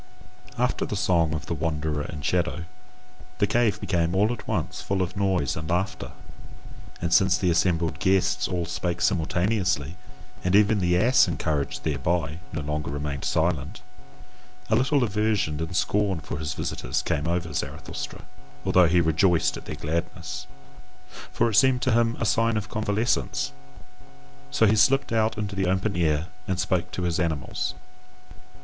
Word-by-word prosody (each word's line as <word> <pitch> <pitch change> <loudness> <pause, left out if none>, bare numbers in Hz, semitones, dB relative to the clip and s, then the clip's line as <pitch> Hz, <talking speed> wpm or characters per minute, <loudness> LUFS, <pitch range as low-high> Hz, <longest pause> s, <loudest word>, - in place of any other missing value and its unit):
After - - 0
the - - -3
song 85 -3 +2
of 75 -1 -5
the 80 - -3
wanderer 80 -1 -2
and 75 0 -6
shadow, 85 -1 0 0.7
the 100 - +3
cave 105 0 +1
became 85 -3 0
all 105 +5 +3
at 120 - -9
once - - -2
full 95 -1 0
of 90 +2 -5
noise 95 -8 +1
and 80 -1 -5
laughter: 90 -7 -2 0.9
and 85 0 -1
since 95 -1 +5
the 90 -2 +1
assembled 85 -1 +1
guests 90 -1 +2
all 90 -2 -2
spake 85 +1 -3
simultaneously, 90 -3 0 0.5
and 90 +1 +2
even 105 0 +4
the 90 -1 +2
ass, 120 +5 +5
encouraged 80 -4 -2
thereby, 80 -2 -1
no - - -3
longer 75 0 -3
remained 70 -1 -4
silent, 85 0 0 0.9
a - - +5
little 130 +3 +2
aversion 105 -8 0
and 80 +3 -4
scorn 100 -1 +1
for 75 -1 -6
his 80 +1 -3
visitors - - -2
came 75 +3 -1
over 85 -2 -1
Zarathustra, 70 - -5 0.4
although 90 -2 +5
he 85 +1 +4
rejoiced 80 +1 +2
at - - -9
their - - -5
gladness. 85 +3 -4 0.8
For - - +2
it - - -1
seemed 130 -1 +4
to 130 - +2
him 115 0 +2
a - - 0
sign 115 +2 +2
of 105 0 -4
convalescence. 105 - 0 1.0
So 65 +11 +3
he 110 +1 +4
slipped 135 +6 +3
out 110 0 +1
into 100 -2 -3
the 95 -1 0
open 95 +3 0
air 80 -1 +1 0.2
and 95 -1 -1
spake 90 -2 0
to 90 - -3
his 85 -2 0
animals. 80 -6 -2
90 Hz, 160 wpm, -25 LUFS, 80-105 Hz, 1.0 s, since